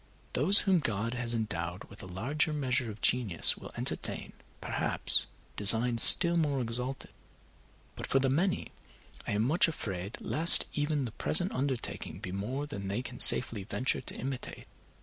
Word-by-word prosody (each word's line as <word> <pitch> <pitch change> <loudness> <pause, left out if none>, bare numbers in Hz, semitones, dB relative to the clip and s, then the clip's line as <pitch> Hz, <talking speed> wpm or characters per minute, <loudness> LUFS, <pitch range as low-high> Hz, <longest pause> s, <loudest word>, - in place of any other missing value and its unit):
Those 185 +10 +6
whom 190 -3 0
God 115 -4 -4
has 120 -1 -3
endowed 90 -5 -5
with 100 - -15
a - - -11
larger 135 - -3
measure 130 -4 -2
of 105 -1 -11
genius 110 -10 +1
will - - -13
entertain, - - -6 0.3
perhaps, - - +2 0.3
designs 115 +3 +6
still 170 -1 +5
more 145 -4 -2
exalted; 125 +2 -3 0.8
but - - -7
for - - 0
the 135 0 0
many 170 +8 -2 0.6
I - - -3
am 105 +1 -1
much 155 +10 +1
afraid 100 - -7
lest 165 +2 +5
even 145 -2 -3
the 115 - -7
present 175 - +2
undertaking 130 -2 -5
be 90 - -9
more 120 +10 -6
than 100 -10 -9
they 100 +6 -4
can 125 -1 -10
safely 115 -5 +3
venture 125 +4 -2
to - - -8
imitate. 130 0 -8
125 Hz, 160 wpm, -28 LUFS, 105-145 Hz, 0.8 s, Those